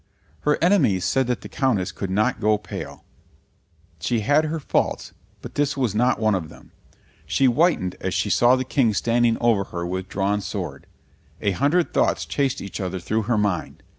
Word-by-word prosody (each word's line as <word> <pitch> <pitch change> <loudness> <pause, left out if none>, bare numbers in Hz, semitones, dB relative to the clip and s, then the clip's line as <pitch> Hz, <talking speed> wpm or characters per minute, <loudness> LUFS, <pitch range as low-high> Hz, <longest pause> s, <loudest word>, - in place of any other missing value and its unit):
Her 150 0 +1
enemies 135 - +3
said 135 -2 +1
that 125 -1 -1
the - - -8
Countess 105 -9 0
could 100 - -5
not 105 +6 +1
go 105 0 +2
pale; 105 - -8 1.0
she 115 +7 0
had 145 +8 +3
her 160 +1 -2
faults, 140 - -1 0.3
but - - -8
this 145 -1 0
was 125 -7 0
not 120 +1 +2
one 110 -1 +2
of 85 -5 -2
them. - - -16 0.6
She 135 - +2
whitened 125 - +2
as - - -2
she - - 0
saw 120 +1 +5
the 130 0 -2
King 120 -5 +1
standing 120 0 +2
over 115 -5 +2
her 85 -1 -5
with 95 +1 -4
drawn 100 +1 0
sword. 90 - -6 0.5
A 100 - 0
hundred 145 - +1
thoughts - - +1
chased 140 -1 -1
each 100 +1 -6
other 95 0 -3
through 110 +4 -1
her 120 - +2
mind. 100 -5 -2
115 Hz, 185 wpm, -23 LUFS, 100-135 Hz, 1.0 s, saw